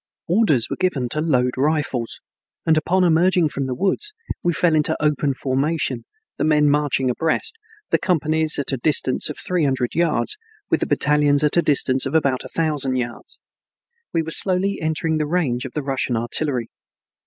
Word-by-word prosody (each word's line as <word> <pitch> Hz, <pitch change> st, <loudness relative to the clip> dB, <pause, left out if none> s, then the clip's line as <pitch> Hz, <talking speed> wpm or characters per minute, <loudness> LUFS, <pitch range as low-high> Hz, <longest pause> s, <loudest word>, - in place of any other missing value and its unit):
Orders 165 Hz, -, +2 dB
were -, -, -4 dB
given 145 Hz, -10 st, -1 dB
to 150 Hz, -, -1 dB
load 125 Hz, -6 st, +2 dB
rifles, 140 Hz, -4 st, -1 dB, 0.5 s
and 160 Hz, -, +4 dB
upon 180 Hz, +4 st, +2 dB
emerging 175 Hz, 0 st, +3 dB
from 140 Hz, -1 st, -3 dB
the 130 Hz, -1 st, -3 dB
woods 200 Hz, -, -1 dB, 0.3 s
we 175 Hz, -, +1 dB
fell 170 Hz, -1 st, +1 dB
into 155 Hz, -1 st, +1 dB
open 150 Hz, -2 st, +1 dB
formation, 135 Hz, -1 st, -1 dB, 0.3 s
the -, -, +1 dB
men 150 Hz, -1 st, +3 dB
marching 145 Hz, -3 st, +1 dB
abreast, 165 Hz, -, -1 dB, 0.4 s
the -, -, +3 dB
companies 160 Hz, -2 st, 0 dB
at 145 Hz, -, -1 dB
a 135 Hz, -, -1 dB
distance 130 Hz, 0 st, +1 dB
of 150 Hz, -, -6 dB
three 180 Hz, -3 st, -1 dB
hundred 130 Hz, -3 st, 0 dB
yards, 170 Hz, -, 0 dB, 0.3 s
with -, -, +3 dB
the -, -, -1 dB
battalions 150 Hz, 0 st, +3 dB
at 150 Hz, -, +2 dB
a 170 Hz, -, +5 dB
distance 135 Hz, -3 st, +2 dB
of 140 Hz, -, -4 dB
about 135 Hz, -5 st, +1 dB
a -, -, -9 dB
thousand 150 Hz, -5 st, -1 dB
yards. 120 Hz, -2 st, -5 dB, 0.7 s
We 165 Hz, -, 0 dB
were 160 Hz, -, -6 dB
slowly 190 Hz, +3 st, +2 dB
entering 160 Hz, 0 st, -1 dB
the 150 Hz, -, -1 dB
range 135 Hz, -8 st, 0 dB
of 130 Hz, -, -7 dB
the 150 Hz, -, -3 dB
Russian 135 Hz, -3 st, -1 dB
artillery. 120 Hz, +1 st, -1 dB
150 Hz, 175 wpm, -21 LUFS, 135-165 Hz, 0.7 s, a